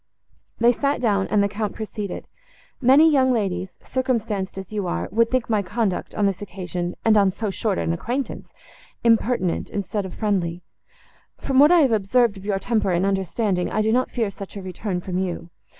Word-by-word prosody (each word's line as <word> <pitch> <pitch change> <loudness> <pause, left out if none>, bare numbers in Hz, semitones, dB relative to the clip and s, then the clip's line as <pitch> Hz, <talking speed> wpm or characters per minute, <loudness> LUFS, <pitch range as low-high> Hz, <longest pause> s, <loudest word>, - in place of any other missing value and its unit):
They 235 +1 +5
sat 280 +4 0
down, 205 -5 +1
and 210 -1 +2
the - - +2
Count 205 0 -4
proceeded. 210 -3 -5 0.6
"Many 270 +5 +6
young 265 -4 +4
ladies, 190 -5 -1
circumstanced 225 -7 -2
as 190 +2 -7
you 205 -3 -2
are, - - -2
would 230 +3 +3
think 255 -2 0
my 215 -3 +1
conduct, 205 -1 -2
on 205 - +1
this 195 -1 0
occasion, 180 -2 -4
and 220 -1 +5
on 200 -2 +4
so 205 +1 -3
short 200 0 -1
an 165 - 0
acquaintance, 245 +10 -4 0.5
impertinent, 230 -5 +2
instead 200 0 -3
of 180 - -10
friendly; 180 -5 -1 0.7
from 270 -1 +1
what 295 +3 +7
I 350 -2 +6
have 270 -5 +3
observed 220 +1 +2
of 195 0 -11
your 205 -2 0
temper 215 +1 0
and 180 +1 +1
understanding, 195 -1 0
I 215 - +1
do 220 - +2
not 255 +2 +2
fear 225 -5 -1
such 195 +1 -9
a 195 - -6
return 185 0 -4
from 180 0 -3
you. 175 -2 -4
205 Hz, 190 wpm, -23 LUFS, 190-235 Hz, 0.7 s, what